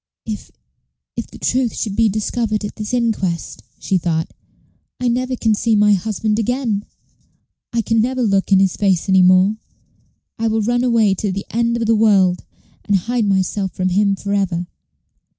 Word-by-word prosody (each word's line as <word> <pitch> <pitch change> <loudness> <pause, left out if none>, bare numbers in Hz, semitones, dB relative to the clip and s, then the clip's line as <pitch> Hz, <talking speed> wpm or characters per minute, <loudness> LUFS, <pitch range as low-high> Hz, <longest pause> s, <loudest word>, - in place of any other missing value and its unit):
"If 215 -2 -6 0.7
if - - -4
the - - -13
truth 250 -2 0
should 205 -3 -3
be 225 0 +3
discovered 215 +1 -2
at 205 - -7
this 215 +1 -5
inquest," 220 -8 -1 0.2
she 190 - 0
thought, 160 -1 -2 0.7
"I 250 - -1
never 255 +2 0
can 225 -2 +1
see 220 +1 +1
my 210 0 +4
husband 215 +2 -1
again; 230 -3 -1 0.9
I 235 -1 0
can 225 +1 +2
never 255 +2 -1
look 195 -2 +1
in 195 - +6
his 190 -2 +2
face 195 -3 +1
any 190 -1 +5
more. 185 +3 +4 0.8
I 225 - 0
will 220 -1 0
run 240 +3 +1
away 230 -5 +3
to 195 +1 -2
the 195 +2 -4
end 235 +1 0
of 230 - -1
the 225 - +3
world, 195 -5 +3 0.4
and 205 - +2
hide 230 +4 0
myself 190 0 0
from 185 0 -1
him 200 +2 +2
for 200 +1 -4
ever." 185 -3 0
210 Hz, 175 wpm, -19 LUFS, 195-230 Hz, 0.9 s, in